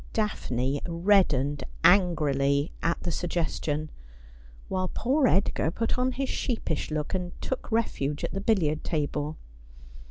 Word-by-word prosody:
Daphne 140 - -1
reddened 165 -6 +2 0.2
angrily 150 -6 +3
at 170 - 0
the 175 - -1
suggestion; 155 -3 -2 0.8
while 185 -1 -1
poor 260 +8 +2
Edgar 195 -6 +2
put 225 +7 -1
on 255 0 +1
his 270 +1 -2
sheepish 225 - -2
look, 150 -1 -2
and 180 -2 -4
took 260 -2 -4
refuge 150 -11 -1
at - - -2
the 195 - -2
billiard 165 -8 +1
table. 150 -1 -2
170 Hz, 125 wpm, -27 LUFS, 145-205 Hz, 0.8 s, angrily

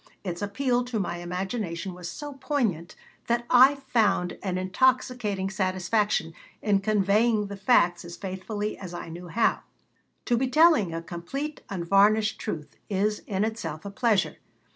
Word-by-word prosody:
its 175 -2 -4
appeal 245 +4 0
to 245 -3 -3
my 175 -3 -2
imagination 180 +1 -4
was 175 -1 -7
so 295 -1 -7
poignant, 210 - -1 0.3
that 235 0 +1
I 260 +3 +7
found 225 -9 +1
an 185 -2 -2
intoxicating 210 -1 +1
satisfaction 185 -2 0 0.3
in 205 -2 +2
conveying 210 +2 +2
the 200 0 -6
facts 190 -5 +3
as 170 0 -9
faithfully 205 +2 -4
as 180 -3 -7
I 175 - -6
knew 175 +2 -8
how. 225 +7 +2 0.7
To 240 - +2
be 260 +2 +1
telling 305 - +5
a 165 0 -4
complete, 275 - -5
unvarnished 200 +4 +3
truth 155 -8 -5
is 210 +1 0
in 195 0 0
itself 175 -8 -5
a 200 - -5
pleasure. 215 -2 +1
200 Hz, 145 wpm, -26 LUFS, 180-235 Hz, 0.7 s, I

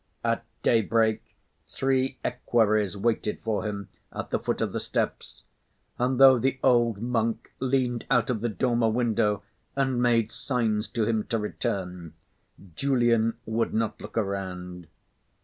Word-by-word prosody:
At 115 0 0 0.2
daybreak, 110 -1 +3 0.5
three 130 0 0
equerries 110 -5 +1
waited 110 0 0
for 110 -1 -1
him 100 -2 -5 0.2
at - - -6
the - - +1
foot - - -2
of - - -1
the - - -1
steps; - - -3 0.6
and 125 +1 +1
though 135 -2 +8
the 130 +2 0
old 120 -4 +3
monk 115 -2 -1
leaned 125 -2 0
out 125 +1 +3
of 110 -4 -2
the 120 - 0
dormer 120 +1 +1
window 110 -3 +1 0.3
and 130 -3 +1
made 115 -2 +2
signs 115 -4 -1
to 115 -2 -1
him 110 -1 0
to 115 - -1
return, 90 -5 -4 0.6
Julian 120 -3 +2
would 115 +1 -1
not 110 -1 -1
look 105 - -8
around. 90 -4 -3
115 Hz, 140 wpm, -27 LUFS, 105-125 Hz, 0.6 s, though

